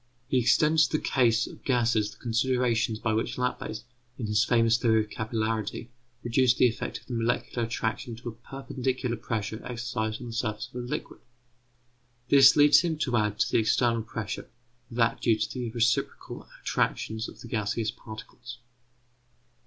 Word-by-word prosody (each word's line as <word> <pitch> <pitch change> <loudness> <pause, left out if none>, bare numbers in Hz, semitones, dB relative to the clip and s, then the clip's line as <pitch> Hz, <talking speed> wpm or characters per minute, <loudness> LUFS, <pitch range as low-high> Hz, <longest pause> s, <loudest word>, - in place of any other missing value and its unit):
He 130 -1 +2
extends 155 +5 +4
to 155 - 0
the - - -9
case 120 -2 +3
of - - -12
gases 120 -5 +2
the - - -14
considerations 120 -1 +1
by 110 0 -1
which 110 - -1
Laplace, 110 -3 -3 0.3
in 120 - -4
his 105 0 +2
famous 115 0 +3
theory 110 -2 +3
of 105 - -15
capillarity, 110 0 -2 0.3
reduced 125 +1 +3
the 125 - +6
effect 115 - -4
of - - -24
the 125 - -7
molecular 120 0 -1
attraction 115 +1 -3
to 115 +1 -7
a - - -6
perpendicular 130 +1 -3
pressure 110 -1 -4
exercised 120 -3 -3
on - - -8
the 115 - -7
surface 110 -2 -3
of 125 0 -4
a - - -7
liquid. - - -5 1.1
This 135 -1 +8
leads 145 0 +7
him 165 -2 -1
to 130 -5 -1
add 105 -2 +1
to - - +1
the - - +4
external 115 +1 +2
pressure, 110 -2 -5 0.4
that 115 -1 +1
due 115 -2 +3
to 110 0 -2
the 125 -2 -3
reciprocal 120 +1 -1 0.2
attractions 110 +1 -1
of - - -14
the - - -9
gaseous 110 0 -1
particles. 110 +1 -10
115 Hz, 170 wpm, -27 LUFS, 110-125 Hz, 1.1 s, This